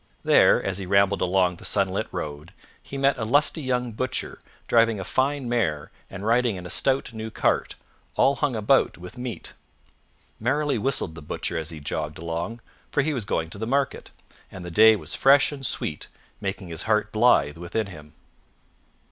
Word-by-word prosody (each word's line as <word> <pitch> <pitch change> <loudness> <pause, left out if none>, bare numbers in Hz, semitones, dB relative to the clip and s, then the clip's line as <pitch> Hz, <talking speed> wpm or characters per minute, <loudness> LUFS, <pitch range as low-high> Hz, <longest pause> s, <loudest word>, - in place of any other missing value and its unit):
There, - - +5
as 100 0 -2
he 95 - -5
rambled 100 0 +3
along 90 -1 +2
the - - -13
sunlit 100 +1 0
road, 75 -3 -6 0.3
he 140 - -8
met 135 -1 +2
a - - -1
lusty 145 +7 +2
young 125 -3 -1
butcher 130 +4 -4 0.3
driving 115 -2 +3
a - - -3
fine 135 +5 0
mare 105 -12 -1 0.2
and 95 +1 -7
riding 120 -1 +2
in 90 -1 -8
a 90 - -6
stout 135 -2 0
new 110 0 -5
cart, - - 0 0.4
all 140 +1 +3
hung 145 -5 0
about 110 +5 +2
with 90 +4 -10
meat. 125 -7 -6 0.9
Merrily 145 -3 0
whistled 115 -8 0
the 85 - -10
Butcher 75 +3 -4
as 80 -1 -3
he 80 -2 -8
jogged 75 +1 -4
along, 85 +8 -4 0.3
for 145 - +1
he 155 +1 0
was 120 -7 -3
going 80 -4 -2
to 100 - -8
the 110 - -3
market, 135 +2 -1 0.4
and 95 -2 -9
the 90 - -6
day 110 +4 +7
was 85 -4 -6
fresh 140 +2 +5
and 140 -2 -8
sweet, 75 - -3 0.3
making 95 -2 -4
his 80 0 -4
heart 105 0 +2
blithe 110 -10 +3
within 90 +6 -2
him. 75 -6 -12
105 Hz, 180 wpm, -25 LUFS, 90-125 Hz, 0.9 s, day